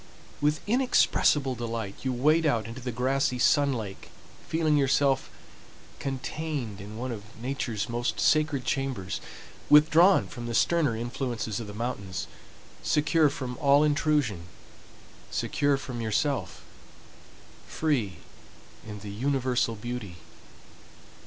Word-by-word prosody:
With 150 +1 +1
inexpressible 205 - +3
delight 115 -4 -4
you 130 - -1
wade 155 +6 +3
out 115 -6 +1
into 115 +3 -8
the 125 0 -3
grassy 130 +2 0
sun 140 +3 +4
lake, 105 -6 -6 0.4
feeling 160 -2 +2
yourself 135 -1 +2 0.7
contained 135 -5 -4
in 105 +2 -9
one 125 +2 -3
of 110 0 -9
Nature's 120 -4 -3
most 120 +1 -2
sacred 150 -4 +2
chambers, 130 -10 -2 0.5
withdrawn 160 +6 +6
from 120 -1 -7
the 115 - -3
sterner 155 -7 +2
influences 120 -2 -3
of 115 - -6
the 105 - -8
mountains, 105 -5 -4 0.6
secure 155 +1 +3
from 130 -3 -5
all 140 +1 +5
intrusion, 145 - +1 0.8
secure 145 -1 +1
from 125 -3 -6
yourself, 130 +6 -1 1.0
free 120 - -1 0.7
in 105 -2 -8
the 105 -1 -7
universal 130 0 0
beauty. 110 -4 -6
130 Hz, 115 wpm, -27 LUFS, 115-145 Hz, 1.0 s, withdrawn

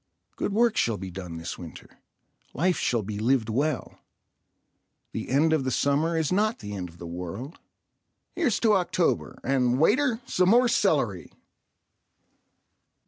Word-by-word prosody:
Good - - -2
work 230 +2 +2
shall 115 -3 +1
be 95 0 -7
done 90 -2 -7
this 80 +2 -6
winter. 85 -3 -11 0.6
Life 180 +3 +1
shall 120 -3 0
be 105 +1 -5
lived 115 0 +1
well. 140 +4 -2 1.1
The - - -5
end 155 +5 +3
of 155 -4 +1
the 130 - -1
summer 145 +6 +1
is 160 -1 0
not 215 +4 +1
the 105 -1 -7
end 90 -3 -5
of 85 - -17
the 85 - -9
world. 90 - -7 0.7
Here's 325 - +1
to 220 -2 +4
October—and, 135 -8 0
waiter, 250 - +3
some 180 0 +2
more 245 +3 +5
celery. 140 - +1
135 Hz, 140 wpm, -26 LUFS, -, 1.1 s, more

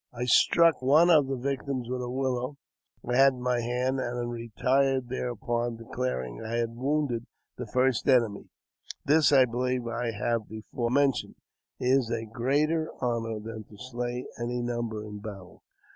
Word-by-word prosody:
I 125 0 -4
struck 165 +5 +5
one 155 +7 +5
of 150 -4 +5
the 135 - -1
victims 135 -1 -3
with 125 0 -3
a 125 - -4
willow 130 +1 -2 0.5
I 125 0 +1
had 135 0 +6
in 125 - -9
my 125 -1 +1
hand, 125 +3 -1
and 120 -1 -3
retired 125 +3 0
thereupon, 120 -1 -2
declaring 115 - -4
I 110 +1 -5
had 115 -1 -1
wounded 130 -2 -1 0.3
the 125 - -5
first 130 +2 +1
enemy. 115 -6 +2 0.6
This, 155 +1 +4
I 135 -2 +7
believe 125 +1 -1
I 120 +1 -2
have 115 0 -2
before 110 +2 -4
mentioned, 140 +1 +1 0.4
is 125 -1 +2
a 115 -1 -2
greater 145 +8 0
honour 115 -3 -1
than 110 0 -7
to 105 - -16
slay 125 +1 -4
any 120 +1 -2
number 120 -3 -3
in 105 -1 -8
battle. 100 -4 -10
125 Hz, 160 wpm, -28 LUFS, 115-130 Hz, 0.6 s, I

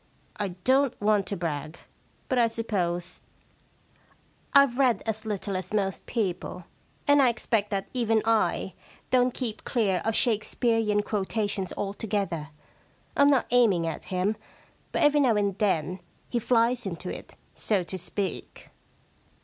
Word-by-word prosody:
I 205 - -1 0.2
don*t 265 0 +3
want 205 -2 +2
to 200 - -3
brag, 155 -1 -4 0.5
but 255 - +1
I 235 - +5
suppose 180 -6 -2 1.3
IVe 280 -2 +6
read 250 -6 +3
as 220 0 -3
little 200 -1 -3
as 185 +2 -5
most 195 -2 -1
people, 185 -5 -2 0.4
and 285 0 +6
I 260 - +5
expect 225 -3 0
that 195 -1 -2
even 225 -3 +1
I 225 -1 +1 0.4
don't 250 0 +4
keep 235 -4 -5
clear 205 -7 +1
of 225 0 0
Shakespearean 220 -2 +1
quotations 205 -2 -2
altogether. 195 -6 -2 0.7
Fm 285 0 +5
not 275 -3 +3
aiming 215 -9 +4
at 165 - -4
him, 190 +3 -1 0.5
but - - +1
every 295 0 +5
now 250 -6 +4
and 200 -2 +1
then 185 -3 0 0.3
he 240 - 0
flies 235 0 +2
into 180 0 -5
it, - - -11 0.2
so 200 -4 0
to 180 - -5
speak.' 185 0 -5
210 Hz, 140 wpm, -27 LUFS, 190-235 Hz, 1.3 s, IVe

